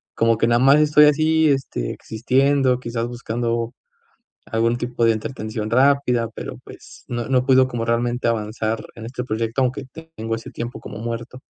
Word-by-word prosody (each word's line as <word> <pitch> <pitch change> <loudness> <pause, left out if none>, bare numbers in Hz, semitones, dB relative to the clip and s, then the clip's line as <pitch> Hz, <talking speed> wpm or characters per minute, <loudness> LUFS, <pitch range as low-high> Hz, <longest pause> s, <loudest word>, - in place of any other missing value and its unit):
como 115 -1 +2
que 115 - +3
nada 120 0 +3
más 135 +4 +6
estoy 150 0 +6
así, 155 +1 +3
este, 135 - -2
existiendo, 130 +3 +1
quizás 115 -1 -3
buscando 120 0 -3 0.7
algún 115 +1 +1
tipo 120 -1 -1
de 115 - +5
entretención 110 -1 -4
rápida, 125 -2 +3
pero, - - -7
pues, - - -14
no 120 -1 -3
no 130 -1 +2
puedo 130 -1 +5
como 120 -2 -3
realmente 120 +1 0
avanzar 110 0 -2
en 115 - -8
este 125 +1 -5
proyecto, 115 +2 -1
aunque 130 +2 -1 0.3
tengo 115 +1 -3
ese 115 0 -7
tiempo 120 +1 -6
como 105 - -8
muerto. 120 +2 -6
120 Hz, 165 wpm, -21 LUFS, 115-130 Hz, 0.7 s, más